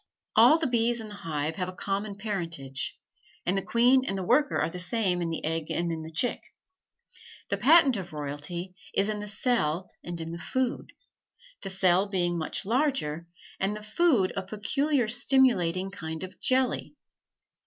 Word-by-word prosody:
All 315 - +7
the 325 - -2
bees 235 -2 +1
in 220 -1 -7
the - - -9
hive 160 -5 -3
have 180 0 -2
a - - -7
common 200 +2 -3
parentage, 165 -10 -4 0.5
and 180 - +1
the 195 - +1
queen 245 +5 +4
and 195 -7 -2
the 190 - -3
worker 265 +9 +3
are - - +1
the 180 - -6
same 180 -2 0
in 170 - -1
the 165 - -3
egg 160 0 -2
and 170 0 -1
in 160 -1 -4
the 160 0 -8
chick; 240 +10 0 1.1
the 200 - 0
patent 275 - +6
of 185 -3 -6
royalty 150 +5 -5 0.2
is 200 +2 +3
in 210 -1 -2
the 210 - -6
cell 190 -6 0
and 175 -1 -4
in 165 0 -5
the 170 - -6
food; 260 +6 -2 0.7
the - - -5
cell 190 0 +3
being 175 -3 0
much 160 +2 -3
larger, 225 - 0 0.3
and 195 +2 0
the 210 - -8
food 220 - +2
a 195 - -1
peculiar 245 +7 0
stimulating 215 -7 +3
kind 160 -2 -6
of 185 - -9
jelly. 260 0 +1
195 Hz, 175 wpm, -28 LUFS, 170-235 Hz, 1.1 s, All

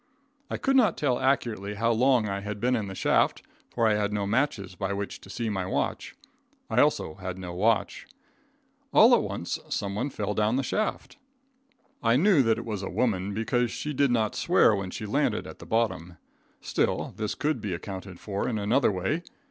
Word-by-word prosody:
I - - -2
could 270 0 +1
not 250 -5 +4
tell 130 -4 +1
accurately 110 -7 0
how 115 +3 +1
long 120 -1 +3
I 100 -1 -2
had 105 +1 -5
been 125 +3 +2
in 110 -4 -2
the 95 - -7
shaft, - - +2 0.3
for 115 -2 +1
I 110 - +4
had 105 0 0
no 105 -1 -1
matches 105 -4 0
by 95 +2 -3
which 100 0 -5
to - - -14
see 115 +4 -3
my 95 -4 -2
watch. - - -2 0.6
I - - +4
also 80 - +1
had 95 -1 -5
no 90 -2 -6
watch. 105 +5 0 0.8
All - - +7
at - - +5
once, - - -4
someone 100 +7 -2
fell 105 -5 -3
down 105 +3 +1
the 135 - 0
shaft. 215 - -2 0.8
I 115 0 +3
knew 175 +1 +5
that 115 -3 +2
it - - -6
was 105 -4 -4
a 95 - -4
woman, 100 -2 0
because 120 +2 0
she 150 +5 -4
did 140 0 +2
not 110 -3 +1
swear 170 - +4
when 100 -2 -4
she 110 - -6
landed 105 - 0
at - - -10
the - - -11
bottom. 105 -7 -1 0.4
Still, - - -1
this 105 -1 -2
could 150 +1 -1
be 100 -4 -2
accounted 95 0 -8
for 100 -1 -3
in 115 - -1
another 110 +5 +2
way. 95 - -1
105 Hz, 195 wpm, -27 LUFS, 100-125 Hz, 0.8 s, All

